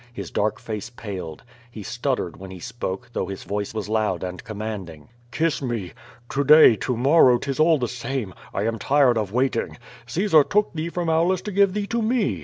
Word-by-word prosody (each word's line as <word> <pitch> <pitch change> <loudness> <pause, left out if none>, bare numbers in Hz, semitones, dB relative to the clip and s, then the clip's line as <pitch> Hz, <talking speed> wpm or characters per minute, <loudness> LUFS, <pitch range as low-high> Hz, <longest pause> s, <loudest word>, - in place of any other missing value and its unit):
His 120 - -7
dark 105 +1 0
face 105 0 -5
paled. 95 -9 -7 0.3
He 110 -3 -9
stuttered 125 -5 -2
when 95 0 -10
h»3 95 - -10
spoke, 120 -2 -5
though - - -2
his 95 -1 -7
voice 100 0 -3
was 110 -2 -4
loud 105 -5 0
and 90 -1 -6
commanding: 100 -8 -7 0.2
"Kiss 160 +5 0
me! 115 -9 -3 0.4
To 140 - 0
day, 150 -4 +8
to 125 +2 -2
morrow, 130 -1 +5
'tis 135 +3 -4
all 160 0 +5
the 125 -3 -1
same. 125 -4 -4 0.2
I 100 - -2
am 115 0 -1
tired 135 -5 +3
of 105 -3 -3
waiting. 125 0 -1 0.3
Caesar 160 +3 +4
took 210 +7 +1
thee 165 +1 -3
from 175 0 -3
Aulus 170 +3 +2
to 210 - -5
give 200 0 +3
thee 210 -1 -1
to 235 +3 -1
me. 215 - 0
120 Hz, 200 wpm, -23 LUFS, 105-155 Hz, 0.4 s, day